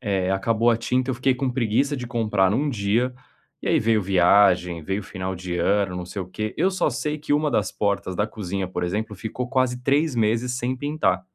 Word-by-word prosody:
eh, 95 -5 0
acabou 115 +4 +2
a 115 - +3
tinta 125 +3 0
eu 130 - -1
fiquei 130 +2 +2
com 130 +1 -1
preguiça 125 +4 +1
de 125 - -5
comprar 105 -5 +1
em - - +1
um 145 +2 0
dia, 120 +2 0 0.5
e - - -2
aí - - +4
veio 110 -1 +2
viagem, 90 -2 +3
veio 95 +6 -2
final 95 -1 -5
de 90 0 -4
ano, 95 +1 +1
não 90 - -4
sei 90 +3 -6
o 90 - -5
quê, 105 +4 -4
eu 190 - +2
só 190 -5 0
sei 145 +4 -2
que 150 -1 -3
uma 150 +1 +2
das 100 -7 0
portas 100 -2 -1
da 105 - +1
cozinha, 95 -3 -4
por 90 -1 -4
exemplo, 105 +4 -3
ficou 115 +5 -5
quase 130 -1 0
3 140 +3 +2
meses 115 +3 +1
sem 130 +1 -2
pintar. 130 -10 0
110 Hz, 220 wpm, -23 LUFS, 95-125 Hz, 0.5 s, aí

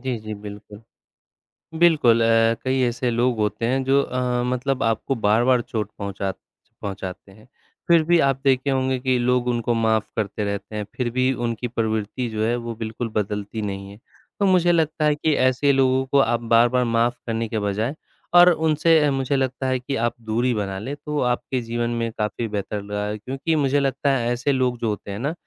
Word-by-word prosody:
जी, 130 -2 -2
जी, 110 0 -6
बिल्कुल। 105 +1 -10 1.0
बिल्कुल 145 -9 +5
अ, 115 0 +4
कई 130 0 +1
ऐसे 120 +1 -1
लोग 120 0 +1
होते 105 +2 -1
हैं 130 +3 +1
जो 135 +1 +3
अ, 125 -2 -1
मतलब 125 +2 -1
आपको 115 +4 0
बार-बार 120 +3 +3
चोट 110 -5 -4
पहुँचा 100 -1 -3 0.5
पहुँचाते 95 -1 -6
हैं, 110 +4 -18 0.4
फिर 170 -2 +5
भी 170 +2 +3
आप 135 -3 +2
देखे 135 0 +2
होंगे 130 -1 +1
कि 130 0 +1
लोग 125 0 +1
उनको 120 -1 0
माफ़ 110 -1 +1
करते 105 -1 -2
रहते 100 +1 -4
हैं, 105 - -2
फिर 125 -2 -1
भी 130 +1 +1
उनकी 115 +1 -2
प्रवृत्ति 110 +1 -2
जो 110 -1 -2
है 120 +2 +1
वो 120 -1 -5
बिल्कुल 115 +1 -4
बदलती 105 +1 -2
नहीं 100 -1 -5
है, 100 - -13 0.4
तो 200 - +2
मुझे 180 -2 +4
लगता 160 -2 +1
है 150 -1 +3
कि 155 +1 +1
ऐसे 130 +2 +3
लोगों 130 0 +2
को 140 +1 +2
आप 120 -3 +2
बार-बार 120 +2 +4
माफ़ 115 +1 +1
करने 115 0 -1
के 110 0 -2
बजाय 105 +7 -2 0.4
और 175 0 +9
उनसे 160 -1 +3
मुझे 135 0 0
लगता 130 0 -1
है 130 0 0
कि 135 +3 -4
आप 115 +1 0
दूरी 115 +3 0
बना 100 -3 -3
लें 130 +8 -5
तो 150 0 -4
आपके 125 +1 -1
जीवन 120 0 -2
में 115 -1 -2
काफ़ी 110 +2 -2
बेहतर 105 0 -4
रहा 105 0 -3
है 105 +1 -3
क्योंकि 135 +8 -2
मुझे 145 -1 +2
लगता 140 +1 0
है 120 -1 -1
ऐसे 125 +4 0
लोग 130 -2 0
जो 115 - -1
होते 105 -1 -5
हैं 100 - -5
ना, 140 +6 -2
120 Hz, 200 wpm, -22 LUFS, 110-135 Hz, 1.0 s, और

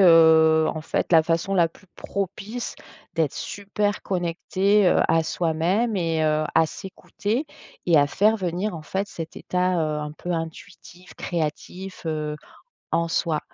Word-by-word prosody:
heu, 160 -2 +7
en 155 - -4
fait, 160 +2 -2
la 160 - +7
façon 165 +4 0
la 170 -3 +4
plus 185 - -21
propice 200 +4 -4 0.4
d'être 160 -4 0
super 205 +1 -2
connecté, 190 +3 +1
heu, - - +3
à 165 0 +4
soi-même 175 +8 0
et 165 -3 0
heu, 155 0 +2
à 160 - +5
s'écouter 205 - -4 0.4
et 170 -2 +5
à 145 - +5
faire 210 +9 +3
venir, 185 +1 -2
en 160 - -7
fait, 190 +6 -2
cet 165 -3 -7
état, 180 0 0
heu, 155 -3 0
un 150 0 -5
peu 175 +3 -5
intuitif, 170 +2 -7
créatif, 180 +3 -4
heu, 150 -1 -2 0.5
en 170 0 +1
soi 165 -2 0
170 Hz, 150 wpm, -24 LUFS, 160-195 Hz, 0.5 s, heu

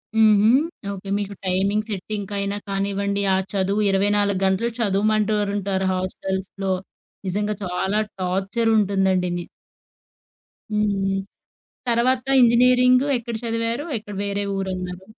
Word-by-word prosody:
హుహు. 215 -1 +5 0.4
ఓకే 195 0 -8
మీకు 200 0 -4
టైమింగ్ 195 +3 +1
సెట్టింగ్‌కైనా 200 0 -3
కానివ్వండి, 200 0 -1
ఆ - - +2 0.2
చదువు 200 +1 +1
24 200 0 +2
గంటలు 190 +5 +1
చదవమంటూ 215 0 +2
ఓరుంటారు 200 -1 -1
హాస్టల్స్‌లో. 190 +1 -3 0.5
నిజంగా 205 +3 -1
చాలా 190 +3 -1 0.2
టార్చర్ 195 +5 0
ఉంటుందండి. 190 -3 +2
ని 175 - -4 1.3
హ్మ్. 210 0 +1
హ్మ్. 195 0 0 0.7
తర్వాత 245 +2 +2 0.2
ఇంజినీరింగ్ 250 +2 +5
ఎక్కడ 235 0 -6
చదివారు? 230 +3 -1
ఎక్కడ 210 -1 -10
వేరే 200 0 -2
ఊరు 195 0 -2
అన్నారు? 180 0 -6
200 Hz, 110 wpm, -22 LUFS, 190-215 Hz, 1.3 s, హుహు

